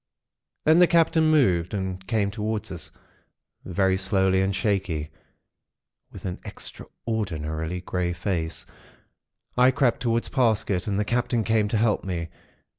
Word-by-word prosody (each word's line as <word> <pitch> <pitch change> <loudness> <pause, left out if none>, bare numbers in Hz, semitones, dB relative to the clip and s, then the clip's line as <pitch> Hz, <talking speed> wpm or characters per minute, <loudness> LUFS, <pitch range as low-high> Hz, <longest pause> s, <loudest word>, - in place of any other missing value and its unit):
"Then 160 +2 +6
the 180 - +7
Captain 165 -1 +4
moved, 95 - +3
and 95 -1 -4
came 100 -1 +1
towards 105 +1 -3
us, 85 -4 -7 0.7
very 95 +1 +2
slow 95 0 +2
and 95 +1 +2
shaky, 100 -6 0
and 75 - -12 1.0
with - - -10
an 90 -1 -4
extraordinarily 80 -6 -4
grey 90 -1 -1
face. 85 -3 -3 0.9
"I 125 +1 +6
crept 130 -2 +2
towards 115 -1 0
Parsket, 110 -8 +1
and 100 -1 0
the 105 - +1
Captain 120 0 0
came 110 -1 +2
to 110 - 0
help 110 -1 +2
me. 85 -3 -3
100 Hz, 135 wpm, -25 LUFS, 90-115 Hz, 1.0 s, the